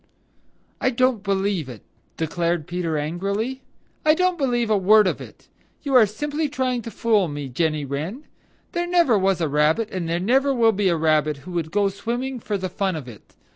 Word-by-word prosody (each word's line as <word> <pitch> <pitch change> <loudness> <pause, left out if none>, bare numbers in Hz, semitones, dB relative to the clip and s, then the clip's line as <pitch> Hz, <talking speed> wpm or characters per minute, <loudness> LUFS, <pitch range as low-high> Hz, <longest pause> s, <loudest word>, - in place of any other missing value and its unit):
"I 260 - +3
don't 255 -3 +1
believe 195 -6 -1
it!" 120 -5 -10 0.3
declared 170 0 -1
Peter 170 -2 -2
angrily. 200 - -2 0.4
"I 310 0 +5
don't 365 +1 +2
believe 240 -6 0
a - - +5
word 210 +2 +5
of 185 - -1
it. - - -13 0.4
You 280 -2 -2
are 240 -4 +7
simply 295 +8 -3
trying 255 -3 -1
to 230 - -7
fool 215 -4 +1
me, 145 -2 -5
Jenny 155 +2 -1
Wren. 155 - -4 0.5
There 345 0 -2
never 345 -9 +3
was 190 -2 +1
a 160 - +1
Rabbit 150 +10 +1
and 175 -3 -3
there 170 +1 0
never 265 +8 +2
will 230 -2 +4
be 200 -2 +1
a 170 - +1
Rabbit 155 -2 +2
who 185 - -8
would 170 -3 -2
go 200 +3 +2
swimming 240 +6 -4
for 210 -2 -3
the 190 -1 -3
fun 190 0 -2
of 145 -5 -6
it. 115 -4 -14
200 Hz, 195 wpm, -23 LUFS, 165-245 Hz, 0.5 s, are